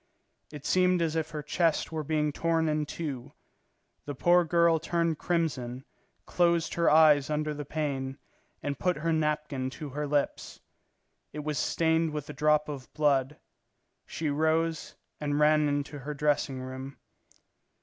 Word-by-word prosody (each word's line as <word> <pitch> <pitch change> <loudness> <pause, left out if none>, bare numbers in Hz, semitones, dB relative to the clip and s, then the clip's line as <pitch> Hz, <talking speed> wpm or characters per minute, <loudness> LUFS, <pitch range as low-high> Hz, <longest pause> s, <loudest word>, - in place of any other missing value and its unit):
It 150 -2 -10
seemed 185 -1 +3
as 165 -1 0
if 160 -1 -1
her 150 -2 -6
chest 165 +2 0
were 160 -1 -3
being 150 0 0
torn 165 +1 0
in 150 -1 0
two. 140 -6 -6 0.7
The 145 - -5
poor 175 +6 +4
girl 170 -1 +3
turned 165 -1 -1
crimson, 135 -7 -2 0.4
closed 170 -2 +1
her 170 -1 +3
eyes 150 -2 +5
under 150 0 -1
the 145 0 -6
pain, 135 -3 -3 0.5
and 140 -2 -3
put 180 -3 +1
her 165 +2 0
napkin 150 -4 -1
to 150 - -6
her 150 +2 -3
lips. 145 0 -2 0.7
It 150 0 -5
was 150 -1 -2
stained 160 -1 +1
with 150 -1 -4
a - - -9
drop 150 0 +2
of 140 -3 -7
blood. 145 -1 +1 0.7
She 155 -2 -2
rose 160 +2 0 0.2
and 145 -1 -1
ran 150 0 +4
into 145 0 -2
her 145 +2 -6
dressing 145 -2 0
room. 130 +1 -7
150 Hz, 150 wpm, -29 LUFS, 145-160 Hz, 0.7 s, eyes